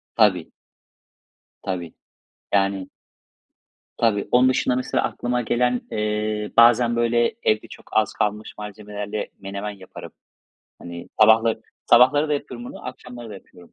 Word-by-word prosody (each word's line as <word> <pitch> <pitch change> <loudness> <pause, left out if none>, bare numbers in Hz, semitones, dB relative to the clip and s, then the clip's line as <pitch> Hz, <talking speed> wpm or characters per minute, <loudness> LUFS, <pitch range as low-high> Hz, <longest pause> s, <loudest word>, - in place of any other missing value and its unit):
Tabii. 95 -7 +2 1.1
Tabii. 90 -4 -4 0.6
Yanii. 100 -1 +1 1.1
Tabii. 105 -4 +1
Onun 125 +1 +5
dışında, 125 -1 +1
mesela 130 - -1
aklıma 125 0 -2
gelen, 125 +1 +1
eee, 105 0 -2
bazen 120 0 +5
böyle, 120 - +2
evde 110 0 +1
çok - - -14
az - - +2
kalmış 105 +1 -2
malzemelerle 105 0 -6
menemen 100 +2 -5
yaparım. 95 -2 -11 0.7
Hani 85 0 -9
sabahları 110 +1 +5 0.2
sabahları 145 +5 +5
da 150 - +1
yapıyorum 125 -3 -6
bunu, - - -10
akşamları 125 -2 -9
da - - -8
yapıyorum. 90 -2 -16
110 Hz, 120 wpm, -23 LUFS, 100-120 Hz, 1.1 s, Onun